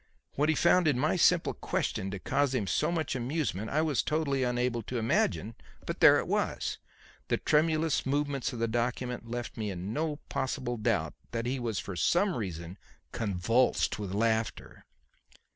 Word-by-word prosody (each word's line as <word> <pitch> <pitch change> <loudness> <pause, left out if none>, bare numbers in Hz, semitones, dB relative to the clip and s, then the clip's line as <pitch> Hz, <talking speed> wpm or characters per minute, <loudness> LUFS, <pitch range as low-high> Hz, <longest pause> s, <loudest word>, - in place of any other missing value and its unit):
What 150 +2 +1
he 160 - +3
found 170 +1 +4
in 145 -5 +3
my 150 +7 +2
simple 180 -1 +3
question 95 - -2
to 100 - -4
cause 135 +6 0
him 110 -5 0
so 150 - +1
much 160 -5 -1
amusement 125 - -2
I 155 +2 +1
was 150 -5 +1
totally 150 -3 0
unable 125 -1 0
to 125 +3 -5
imagine. 135 - +1 0.3
But - - -4
there - - +8
it - - -2
was. - - -1 0.5
The - - +1
tremulous 155 0 +2
movements 140 0 -1
of 125 - -6
the 115 0 0
document 120 +1 -2
left 120 0 -5
me 110 -2 -2
in 95 +2 -4
no 155 +1 -1
possible 130 -2 -2
doubt 110 - 0 0.2
that 115 0 -2
he 130 +2 -1
was 115 -4 -2
for 95 - -4
some 175 - +2
reason 90 -4 -5 0.3
convulsed 110 +4 +1
with 100 -3 -4
laughter. 110 0 -1
125 Hz, 170 wpm, -30 LUFS, 110-150 Hz, 0.5 s, there